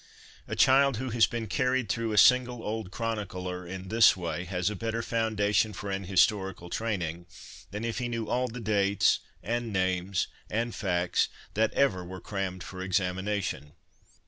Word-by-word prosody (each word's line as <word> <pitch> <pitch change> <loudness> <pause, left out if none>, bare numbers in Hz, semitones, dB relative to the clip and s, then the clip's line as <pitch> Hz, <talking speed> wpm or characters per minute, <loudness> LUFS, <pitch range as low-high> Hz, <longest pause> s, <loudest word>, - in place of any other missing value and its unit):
A - - -3
child 135 -1 +5
who 130 +1 -3
has 115 -1 +4
been 115 -1 -4
carried 125 +3 0
through 115 +2 -1
a 105 - -1
single 125 0 +5
old 110 -2 -3
chronicler 95 -5 -4
in 95 +1 -7
this 115 -3 +6
way 85 0 -3
has 90 0 -2
a - - -4
better 115 +2 -2
foundation 110 -2 +1
for 100 +1 -5
an 95 0 -3
historical 95 -2 +1
training 85 -6 -3 0.4
than 105 +3 -4
if 115 +1 -2
he 120 - -1
knew 115 -2 -3
all 125 +1 0
the 125 +1 -7
dates 100 -2 +2 0.2
and 120 0 -2
names 95 0 0 0.2
and 115 +2 -1
facts 90 -3 0 0.2
that 110 +1 +2
ever 95 -10 +2
were 90 +1 -8
crammed 95 -3 -4
for 95 +1 -8
examination. 95 -4 -1
105 Hz, 165 wpm, -28 LUFS, 95-115 Hz, 0.4 s, this